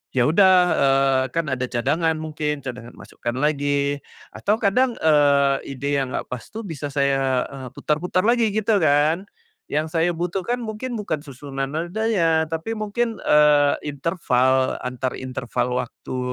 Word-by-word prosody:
Ya 125 - +4
udah, 190 +4 +5 0.3
eee, 135 -1 +3
kan 165 -1 +1
ada 130 -1 -1
cadangan. 155 +7 0
Mungkin 150 -2 -3
cadangan 125 -2 -7
masukkan 120 0 -6
lagi. 145 0 0 0.3
Atau 210 +2 0
kadang, 240 +4 +2
eee, 145 -3 +4 0.2
ide 140 +1 0
yang 130 -1 -4
nggak - - -3
pas 125 -2 -4
tuh 225 +1 -7
bisa 155 -5 -5
saya, 135 -2 +1
eee, 135 -2 -8
putar-putar 180 +4 0
lagi 235 -2 +3
gitu 215 -1 +2
kan. 155 +5 +2 0.4
Yang 155 +1 -1
saya 165 +1 +3
butuhkan 185 +7 -2
mungkin 230 +3 -5
bukan 155 -8 -3
susunan 135 0 -5
nadanya, 170 -1 0
tapi 165 +7 -3
mungkin, 225 +2 -2
eee, 150 -1 +5
interval 130 -4 +1
antar 125 0 -3
interval 125 -1 -2
waktu 130 - -8
150 Hz, 145 wpm, -22 LUFS, 135-180 Hz, 0.4 s, udah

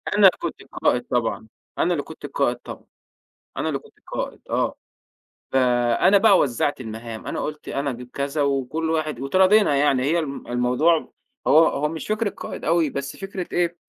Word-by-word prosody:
أنا 200 -2 +8
كنت 170 - -5
القائد 125 - 0
طبعًا، 115 -2 -1 0.3
أنا 175 +1 +2
اللي 145 -4 -2
كنت 160 - -10
القائد 140 -3 0
طبعًا، - - -10 0.7
أنا - - -1
اللي - - -1
كنت - - -20
القائد. - - -5
آه، - - 0 0.8
فأنا 125 +8 +4
بقى 200 -2 +6
وزّعت 120 -5 0
المهام، 110 0 -7
أنا - - -3
قُلت: 150 0 -5
"أنا 140 0 -1
أجيب 125 0 -8
كذا، 140 +2 -2
وكلّ 140 +4 -1
واحد" 155 -5 -1
واتراضينا 185 +3 +4
يعني، 140 -2 +3
هي 160 +5 +2
ال 140 -4 -4
الموضوع 125 +7 +2 0.3
هو 150 - +6
هو 150 +2 -1
مش 160 0 -6
فكرة 215 -1 0
قائد - - -8
أوي، 165 -2 +2
بس 140 0 -5
فكرة 195 -2 -5
إيه 175 -1 0
145 Hz, 170 wpm, -23 LUFS, 125-170 Hz, 0.8 s, أنا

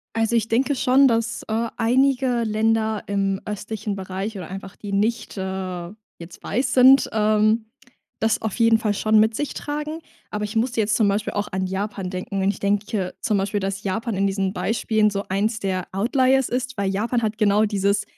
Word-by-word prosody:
Also, 225 +1 +1
ich 225 -1 +1
denke 265 +5 +1
schon, 265 +2 +4
dass, 230 -2 0
äh, 225 +1 -1
einige 250 +1 +2
Länder 220 0 0
im 195 -1 -1
östlichen 210 0 -4
Bereich 195 +2 -5
oder 180 -4 -7
einfach, 195 0 -8
die 205 -1 -7
nicht, 220 +3 -1
äh, 185 -2 -4 0.3
jetzt 170 +1 -12
weiß 255 +4 -1
sind, 260 +1 +7
ähm, 215 +1 +2 0.5
das 220 0 +1
auf 220 -3 -3
jeden 230 -1 +5
Fall 215 -2 0
schon 215 +1 +2
mit 220 +1 +3
sich 295 - -3
tragen. 300 +2 -4 0.3
Aber 210 0 -3
ich 210 +2 -6
musste 235 0 +1
jetzt 215 +1 +1
zum 215 -3 +3
Beispiel 205 +2 -1
auch 205 0 -2
an 190 0 -1
Japan 195 -1 -3
denken. 190 +1 -3
Und 195 - +3
ich 200 - -5
denke 200 -1 -1
zum 210 -2 +1
Beispiel, 200 +1 -1
dass 195 +1 -3
Japan 225 +4 -2
in 195 - +2
diesen 195 -1 -1
Beispielen 215 0 +1
so 200 0 -3
eins 210 +4 0
der 185 -2 -2
Outliers 260 +5 +2
ist, 255 +1 -3
weil 200 -1 0
Japan 230 +5 -1
hat 215 -1 -2
genau 210 0 +3
dieses 200 -1 +1
215 Hz, 190 wpm, -23 LUFS, 195-230 Hz, 0.5 s, sind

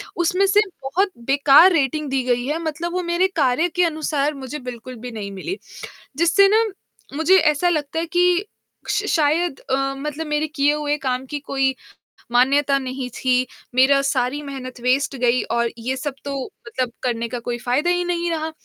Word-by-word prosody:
उसमें 360 +3 +2
से 410 +2 +5 0.2
बहुत 375 +9 0
बेकार 285 +6 +6
रेटिंग 300 -1 0
दी 265 -1 0
गई 245 -1 0
है 300 +4 -1
मतलब 330 +2 -3
वो 365 0 -1
मेरे 345 +2 +2
कार्य 290 +2 +2
के 360 - +3
अनुसार 305 -2 -1
मुझे 275 +1 -7
बिल्कुल 245 +1 -9
भी 245 +1 -8
नहीं 205 -3 -6
मिली। 195 - -5 0.6
जिससे 340 +5 +5
ना, 450 - +5 0.5
मुझे 335 +5 +5
ऐसा 315 +1 +3
लगता 310 -1 -1
है 330 - -1
कि 355 +3 +2 0.4
श - - 0
शायद 320 0 +1
अ, 270 0 -1
मतलब 300 +3 -4
मेरे 300 +1 0
किए 290 -1 +1
हुए 295 -1 -1
काम 260 -2 -2
की 295 - -2
कोई 270 -1 0 0.6
मान्यता 275 +3 +3
नहीं 260 -1 -5
थी, 255 -1 +1 0.3
मेरा 270 +2 +5
सारी 270 0 0
मेहनत 260 -3 -8
वेस्ट 270 +2 +1
गई 250 0 +2
और 235 0 +1
ये 250 +3 -3
सब 285 +1 -4
तो 280 0 -4 0.3
मतलब 250 0 -2
करने 235 -2 -1
का 245 - -4
कोई 240 0 -2
फायदा 275 +8 +1
ही 355 0 +1
नहीं 345 -1 -1
रहा, 320 -1 -2
285 Hz, 180 wpm, -21 LUFS, 255-325 Hz, 0.6 s, बेकार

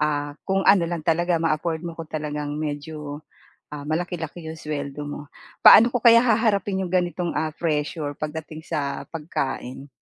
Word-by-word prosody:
ah, 145 -1 -1
kung 195 0 +1
ano 190 -4 +6
lang 170 0 -3
talaga 170 +1 +2
ma-afford 160 0 0
mo 170 - -4
ko, 165 - -6
talagang 150 -1 -4
medyo, 150 0 -5 0.5
ah, 145 -1 -6
malaki-laki 170 0 -3
yung 160 0 -7
sweldo 145 -1 -4
mo. 145 0 -6 0.4
Paano 230 +3 +10
ko 245 - 0
kaya 230 -1 +8
haharapin 210 -4 +1
yung 175 - -5
ganitong, 175 -1 0
ah, 155 0 -1
pressure 150 -2 -2
pagdating 155 +1 -6
sa 140 -2 -3
pagkain? 140 -4 -4
160 Hz, 155 wpm, -24 LUFS, 150-175 Hz, 0.5 s, Paano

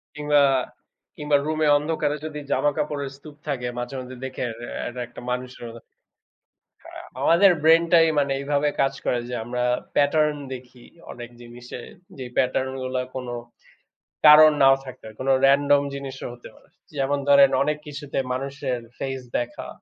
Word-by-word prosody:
কিংবা, 150 0 +2 0.8
কিংবা, 150 -1 +1
রুমে 155 0 0
অন্ধকারে 150 0 -1
যদি 150 -1 -6
জামা 145 - +2
কাপড়ের 145 -2 -3
স্তূপ 145 +1 -14
থাকে, 125 -3 -2
মাঝে, 120 +3 -5
মাঝে, 130 0 -9
দেখে 130 -1 -4
রে 120 - -8 0.2
এটা 125 +1 -7
একটা - - -11
মানুষের 125 -1 -5 1.3
আ - - -7 0.2
আমাদের 175 +6 +5
Brain-টাই 165 0 +5
মানে 140 -1 0
এইভাবে 145 +1 0
কাজ 135 0 +1
করে 120 - +1
যে - - -6
আমরা 125 0 -2 0.3
Pattern 150 +1 +2 0.2
দেখি 125 -1 -12 0.3
অনেক 120 0 -9
জিনিসে। 120 +1 -10 0.4
যে 130 - -6
Pattern-গুলো 130 0 -1 0.2
কোন 125 -1 -5 1.0
কারণ 155 +1 +9
নাও 135 0 +7
থাকতে 130 - -11
পারে, 110 -1 -11
কোন 135 - -2 0.2
Random 140 +1 +4
জিনিসও 135 -1 -7
হতে 120 - -13
পারে। - - -22 0.3
যেমন 140 +1 0
ধরেন 140 -1 +7
অনেক 150 +1 -1
কিছুতে 145 -1 -7 0.2
মানুষের 135 -1 -3 0.2
Face 135 -2 -4
দেখা। 120 0 -6
140 Hz, 145 wpm, -23 LUFS, 125-150 Hz, 1.3 s, কারণ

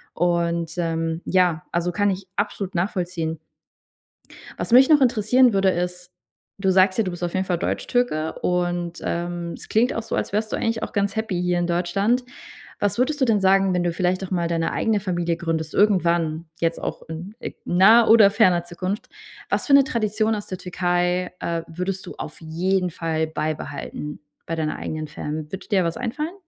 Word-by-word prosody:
Und, 170 -1 0
ähm 165 -1 -1
ja, 180 -3 +2
also 175 +1 0
kann 205 +1 +1
ich 190 0 -3
absolut 200 -2 -2
nachvollziehen. 175 -3 -2 1.2
Was - - -4
mich 260 +2 +7
noch 300 -2 +6
interessieren 245 0 +4
würde, 195 -1 +3
ist, 180 0 -3 0.5
du 190 -1 +1
sagst 185 +1 +4
ja, 225 - +3
du 185 - -3
bist 175 0 -7
auf 175 - -2
jeden 190 0 0
Fall 175 -2 0
Deutschtürke 170 -7 -1
und, 175 -1 -1
ähm, 175 0 -3
es - - -10
klingt 235 +4 +2
auch 225 - -3
so, - - -3
als - - -2
wärst 215 +1 -1
du - - +2
eigentlich 225 -1 -1
auch - - -5
ganz 200 0 0
happy 195 -5 -1
hier 180 0 +1
in 175 - 0
Deutschland. 195 +8 +1 0.6
Was 205 +2 0
würdest 290 +3 +1
du - - +5
denn 220 -4 +2
sagen, 195 0 +4
wenn 180 -1 0
du 170 - +1
vielleicht 185 +2 0
doch 190 - -5
mal 170 -2 0
deine 165 -1 -1
eigene 220 -2 +1
Familie 175 -3 -1
gründest 165 -2 -3
irgendwann, 170 -5 +2
jetzt 165 0 -1
auch - - -4
in, 180 +7 -7
äh, - - -6
naher 220 +6 +6
oder 215 -3 +8
ferner 185 -5 +3
Zukunft. 185 +5 -4 0.4
Was - - -1
für 280 - +6
'ne 280 -1 +8
Tradition 220 -2 0
aus 205 - -6
der 185 - -5
Türkei, 180 0 0
äh, 170 -1 -2
würdest 180 +3 -4
du - - -8
auf 150 - -7
jeden 180 +3 0
Fall 160 -1 -2
beibehalten 150 -1 -4 0.3
bei 165 - -3
deiner 155 -1 -2
eigenen 155 0 -4
Fam. 150 0 -6
Würde 190 0 -7
dir 200 -4 +3
da - - +1
was 165 - -2
einfallen? 300 +8 -3
180 Hz, 195 wpm, -23 LUFS, 170-205 Hz, 1.2 s, oder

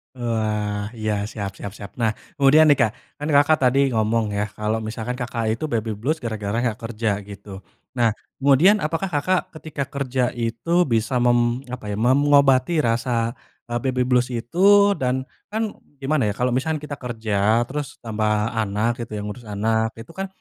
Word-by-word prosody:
Wah, 105 -3 -2
iya, 110 0 -1 0.2
siap 100 -3 -4
siap 100 - -7
siap. 100 -1 -9
Nah, 115 -3 +1 0.2
kemudian 150 +3 +6
nih 145 - +6
Kak, 110 - +3 0.3
kan 150 - -4
Kakak 145 +2 +5
tadi 130 +2 +4 0.2
ngomong 110 +1 +2
ya, 100 - +1
kalau 105 +1 0
misalkan 115 +2 -4
Kakak 125 -2 -3
itu 115 - -9
baby 110 -2 -1
blues 155 +8 -1
gara-gara 110 -2 -3
nggak 115 -3 -1
kerja, 115 -1 -2 0.2
gitu. 100 0 -11 0.5
Nah, 120 -3 +3 0.2
kemudian 140 +9 +5
apakah 165 +5 -1
Kakak 180 +6 +2 0.2
ketika 155 -2 -4
kerja 135 -2 -2
itu 115 +5 -4
bisa, 115 -4 0
mem 120 +1 +2
apa 125 -3 -6
ya, - - -2
mengobati 135 +3 +4
rasa, 115 0 0 0.4
eee, 120 - 0
baby 130 -1 +1
blues 125 -1 +2
itu 120 +9 -5 0.4
dan 130 0 0 0.3
kan 220 +1 -1 0.4
gimana 135 -4 +1
ya, 105 - 0
kalau, 125 +3 0
misalkan 150 +5 0
kita 145 -1 -6
kerja, 110 -2 +1
terus 145 +2 -5
tambah 110 -2 -1 0.3
anak 105 +1 0
gitu, 120 -1 -6
ya, 105 - -3
ngurus 105 +4 -7
anak. 110 +2 0
Itu 115 +8 -11
kan, 195 +3 -4
120 Hz, 170 wpm, -22 LUFS, 110-135 Hz, 0.5 s, kemudian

